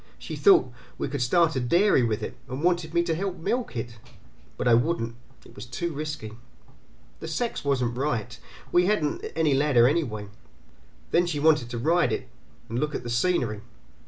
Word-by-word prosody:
She - - -7
thought 380 - +5 0.2
we - - -2
could 140 -1 -3
start 160 +6 +3
a - - +1
dairy 170 +6 +3
with 115 -3 -1
it, - - -5
and 130 +4 -5
wanted 175 -2 +1
me 170 - +4
to 165 - -1
help 185 +2 -3
milk 235 - -2
it; 115 0 -6 0.6
but - - -1
I 120 - +6
wouldn't; 115 -2 +1 0.3
it - - -16
was 105 +4 -9
too 170 +7 -3
risky. 150 -6 -5 0.9
The 160 - -7
sex 230 +9 -2
wasn't 125 -4 0
right, 125 -4 -2 0.2
and - - -24
we 180 +1 +4
hadn't 175 -8 0
any 160 -3 +2
ladder 135 -4 +4
anyway. 115 -9 -1 0.8
Then 175 +1 +3
she 155 -4 -2
wanted 150 -5 +3
to 120 - -4
ride 165 +8 +2
it, 130 - -3 0.4
and 115 +2 -3
look 150 +1 -1
at - - -4
the 120 - -5
scenery. 120 - 0
145 Hz, 190 wpm, -26 LUFS, 120-170 Hz, 0.9 s, I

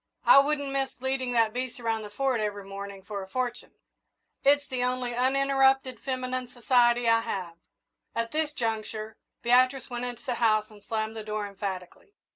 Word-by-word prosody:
I - - +9
wouldn't 285 0 +1
miss 270 -2 -2
leading 260 -1 -1
that 225 -2 +3
beast 255 0 -4
around 225 -2 -1
the 210 - -7
Fort 255 +2 0
every 205 -2 -3
morning 195 0 -7
for 200 0 -5
a 190 - -8
fortune. 245 +3 -3 0.7
It's 285 +1 +4
the 255 -1 -2
only 250 -1 -1
uninterrupted 270 0 +3
feminine 255 -1 -3
society 240 -1 +3
I 230 0 +5
have." 190 -7 -4 0.6
At 230 0 -1
this 310 -1 0
juncture, 220 -3 -3 0.3
Beatrice 255 +2 +3
went 240 0 -3
into 245 0 -7
the 255 - 0
house 215 -1 +3
and 210 -1 -15
slammed 220 0 -2
the 220 - -5
door 210 0 -3
emphatically. 200 - -6
240 Hz, 170 wpm, -28 LUFS, 215-260 Hz, 0.7 s, I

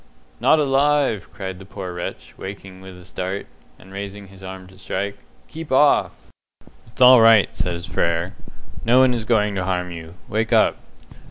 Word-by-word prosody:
"Not - - +4
alive!" 140 -5 +1
cried 95 -2 -7
the - - -11
poor 95 -2 -7
wretch, 90 0 -7
waking 95 -1 -9
with 95 -1 -11
a 90 - -14
start, 95 +1 -4 0.3
and 95 +1 -16
raising 100 0 -7
his 95 0 -15
arm 95 0 -8
to 95 +1 -17
strike. 100 +1 -4 0.3
"Keep 160 -2 -9
off!" 145 +2 +4 0.7
"It's 115 +3 0
all 125 -1 +9
right," 115 -3 +5
said 85 0 -3
Frere. 85 +2 -1 0.5
"No 120 +2 +4
one 130 -1 +5
is 115 -3 -3
going 105 -3 +2
to 95 -2 -2
harm 90 -1 -2
you. 85 0 -9
Wake 110 +1 -2
up." - - +4
100 Hz, 170 wpm, -21 LUFS, 95-115 Hz, 0.7 s, all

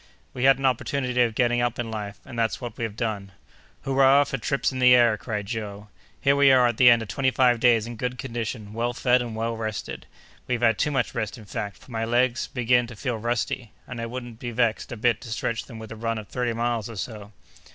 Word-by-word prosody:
"We 125 0 -1
had 135 -1 +6
an 135 - -3
opportunity 125 -1 0
of 115 -2 +2
getting 120 0 +2
up 120 -1 -1
in 115 -2 -3
life, 105 -2 -5
and 120 -3 -7
that's 115 -1 0
what 120 -2 -6
we - - -5
have 105 -2 -6
done!" 105 -4 -3 0.5
"Hurrah 135 +1 +5
for 135 -1 -4
trips 140 +5 0
in 130 - -5
the 125 0 +7
air!" 120 -3 +5
cried 105 -1 -4
Joe. 105 -2 -6 0.3
"Here 140 0 +3
we 140 -1 +6
are 130 -1 +6
at 120 -2 0
the 125 - +8
end 115 -1 +5
of - - -9
twenty 130 +6 +1
five 125 -2 +3
days 115 -2 +4
in 120 -1 -7
good 125 +2 -3
condition, 115 -4 -5
well 120 +2 -1
fed, 125 +1 +2
and 120 -2 -5
well 115 +1 -2
rested. 110 -2 -5 0.4
We've 125 -2 -1
had 115 -2 +3
too - - +2
much 135 -5 -1
rest 110 +3 -3
in 110 - -12
fact, 100 0 -5
for - - -17
my 115 -1 -2
legs 120 +2 +1
begin 125 -1 +2
to 115 - -10
feel 120 +1 -3
rusty, 120 0 -2
and 125 -2 -6
I 115 - -3
wouldn't 120 -1 -7
be 120 - -4
vexed 115 -2 0
a 120 - -5
bit 120 +1 +1
to 120 - -9
stretch 115 +1 -2
them 115 - -10
with 110 0 -9
a - - -6
run 115 0 -2
of 105 -2 -7
thirty 125 -2 -1
miles 115 -1 -1
or 115 - -8
so!" 105 0 -6
120 Hz, 245 wpm, -25 LUFS, 110-125 Hz, 0.5 s, the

